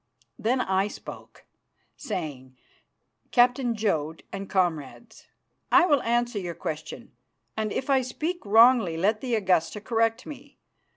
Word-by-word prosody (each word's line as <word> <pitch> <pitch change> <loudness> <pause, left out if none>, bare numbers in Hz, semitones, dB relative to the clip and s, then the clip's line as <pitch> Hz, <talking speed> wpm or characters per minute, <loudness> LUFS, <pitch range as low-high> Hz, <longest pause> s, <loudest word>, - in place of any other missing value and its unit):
Then 250 +4 +1
I 190 -1 +1
spoke, - - -11 0.5
saying, 130 -6 -6 0.7
"Captain 245 -1 +3
Jodd, 160 -8 -2
and 195 0 -6
comrades, 180 - -2 0.4
I 355 0 +6
will 290 -6 +3
answer 240 -1 0
your 175 -3 -5
question, 155 -3 -6 0.4
and 215 -1 -2
if 265 - -3
I 270 -2 +3
speak 315 +8 -4
wrongly 225 -4 +5
let 210 +5 +1
the 245 -3 -1
Augusta 185 -2 +1
correct 225 +2 0
me. 285 -1 -11
220 Hz, 125 wpm, -26 LUFS, 180-245 Hz, 0.7 s, I